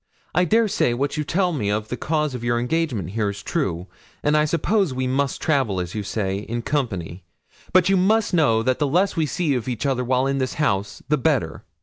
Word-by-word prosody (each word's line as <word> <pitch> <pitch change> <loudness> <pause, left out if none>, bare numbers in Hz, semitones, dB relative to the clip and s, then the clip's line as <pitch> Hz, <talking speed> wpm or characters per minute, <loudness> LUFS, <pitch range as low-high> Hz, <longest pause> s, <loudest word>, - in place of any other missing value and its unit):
I 180 +2 +3
dare 225 +5 +3
say 120 - +1
what 140 +3 -1
you 150 - -1
tell 180 +3 0
me 105 -9 -1
of 105 +1 -1
the - - -2
cause 150 0 -1
of 125 -2 -5
your 120 0 +1
engagement 125 - -1
here 105 -1 0
is 100 -1 -7
true, 85 -1 -2 0.4
and 150 +1 +2
I 150 0 +4
suppose 170 0 +1
we 130 0 -1
must 135 +1 0
travel, 130 -11 +1
as 90 -1 -4
you 110 - -2
say, 100 -1 -2
in 120 +3 -4
company; 95 - -2 0.5
but 185 -1 +4
you 195 0 +4
must 210 +3 +2
know 115 -10 +3
that 130 +1 +1
the 145 - +2
less 180 +8 +2
we 160 -3 +1
see 160 -1 0
of 125 -3 -2
each 125 +2 -3
other 130 -2 +1
while 130 +1 +1
in 135 0 0
this 130 -1 -2
house 100 -9 -1
the 150 +1 +2
better.' 130 - 0
130 Hz, 230 wpm, -22 LUFS, 110-155 Hz, 0.5 s, I